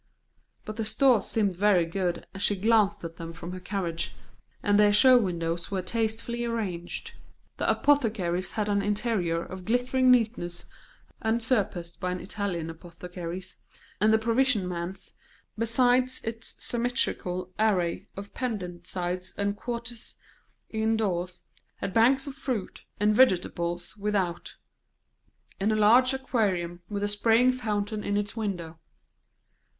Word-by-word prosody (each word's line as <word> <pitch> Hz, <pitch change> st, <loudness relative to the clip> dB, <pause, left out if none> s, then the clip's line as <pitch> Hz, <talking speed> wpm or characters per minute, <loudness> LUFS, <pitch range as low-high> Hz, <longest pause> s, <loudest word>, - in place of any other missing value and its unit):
But 215 Hz, 0 st, -6 dB
the 225 Hz, -, -1 dB
stores 250 Hz, -1 st, +3 dB
seemed 205 Hz, -5 st, +1 dB
very 190 Hz, -2 st, +4 dB
good, 175 Hz, +1 st, -2 dB
as 195 Hz, -, -7 dB
she 205 Hz, -, +2 dB
glanced 205 Hz, -1 st, +2 dB
at 165 Hz, 0 st, -7 dB
them 165 Hz, -1 st, -7 dB
from 170 Hz, +1 st, -7 dB
her 185 Hz, -, -6 dB
carriage, 180 Hz, -3 st, -3 dB, 0.5 s
and 205 Hz, 0 st, +3 dB
their 210 Hz, 0 st, +6 dB
show 255 Hz, +5 st, +8 dB
windows 170 Hz, -4 st, -2 dB
were 190 Hz, -2 st, -2 dB
tastefully 230 Hz, +2 st, -2 dB
arranged; 200 Hz, -7 st, -4 dB, 0.4 s
the -, -, 0 dB
apothecary's 210 Hz, -11 st, +1 dB
had 210 Hz, -1 st, -1 dB
an 200 Hz, -1 st, +2 dB
interior 200 Hz, -5 st, 0 dB
of 185 Hz, 0 st, -8 dB
glittering 250 Hz, +4 st, +2 dB
neatness 225 Hz, -8 st, +2 dB, 0.6 s
unsurpassed 220 Hz, -7 st, 0 dB
by 180 Hz, -1 st, -1 dB
an 180 Hz, -, -3 dB
Italian 180 Hz, -5 st, -3 dB
apothecary's; 175 Hz, +2 st, -8 dB, 0.4 s
and 215 Hz, +2 st, +4 dB
the 220 Hz, -, +6 dB
provision 230 Hz, -2 st, +2 dB
man's, 180 Hz, +2 st, -4 dB, 0.4 s
besides 245 Hz, +3 st, +2 dB
its 225 Hz, 0 st, -3 dB
symmetrical 185 Hz, -7 st, -1 dB
array 185 Hz, -6 st, +1 dB
of 200 Hz, +1 st, -8 dB
pendent 180 Hz, -8 st, -4 dB
sides 180 Hz, 0 st, -2 dB
and 200 Hz, 0 st, 0 dB
quarters 235 Hz, +1 st, -6 dB, 0.6 s
indoors, 210 Hz, -5 st, -1 dB, 0.3 s
had 190 Hz, -, -5 dB
banks 260 Hz, +4 st, +4 dB
of 280 Hz, -, -6 dB
fruit 255 Hz, -7 st, -4 dB
and 210 Hz, +1 st, +3 dB
vegetables 175 Hz, -7 st, +2 dB
without, 200 Hz, -4 st, -2 dB, 1.0 s
and 205 Hz, +3 st, +2 dB
a -, -, +2 dB
large 235 Hz, +5 st, +6 dB
aquarium 195 Hz, -10 st, -1 dB
with 205 Hz, -1 st, -3 dB
a -, -, +2 dB
spraying 225 Hz, +4 st, +4 dB
fountain 210 Hz, -4 st, -2 dB
in 205 Hz, 0 st, 0 dB
its 205 Hz, +1 st, -2 dB
window. 175 Hz, -7 st, -4 dB
205 Hz, 135 wpm, -27 LUFS, 180-230 Hz, 1.0 s, show